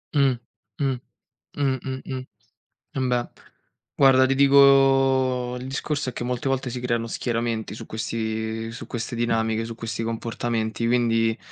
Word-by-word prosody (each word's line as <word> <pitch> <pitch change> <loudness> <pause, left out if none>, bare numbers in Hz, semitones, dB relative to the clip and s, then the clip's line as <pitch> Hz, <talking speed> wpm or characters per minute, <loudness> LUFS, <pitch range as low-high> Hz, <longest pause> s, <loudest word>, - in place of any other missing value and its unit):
Mh. 135 -3 +4 0.5
Mh. 135 -1 +1 0.6
Mh, 135 -2 +1
mh, 130 -1 -4
mh. 130 -1 -4 0.7
Embè. 125 -2 0 0.7
Guarda, 130 -1 +6
ti 135 +1 +1
dico 135 -2 +5
il 125 - -7
discorso 140 +1 -2
è - - -8
che 120 - -4
molte 125 +2 -2
volte 135 -1 -1
si 125 0 -5
creano 120 -2 -1
schieramenti 115 -2 -2
su 110 - -8
questi 110 0 -3
su 120 - -8
queste 120 0 -4
dinamiche, 115 -1 0
su 115 0 -7
questi 115 -1 -4
comportamenti 115 0 -2
quindi 115 -2 +2
120 Hz, 140 wpm, -24 LUFS, 115-130 Hz, 0.7 s, Guarda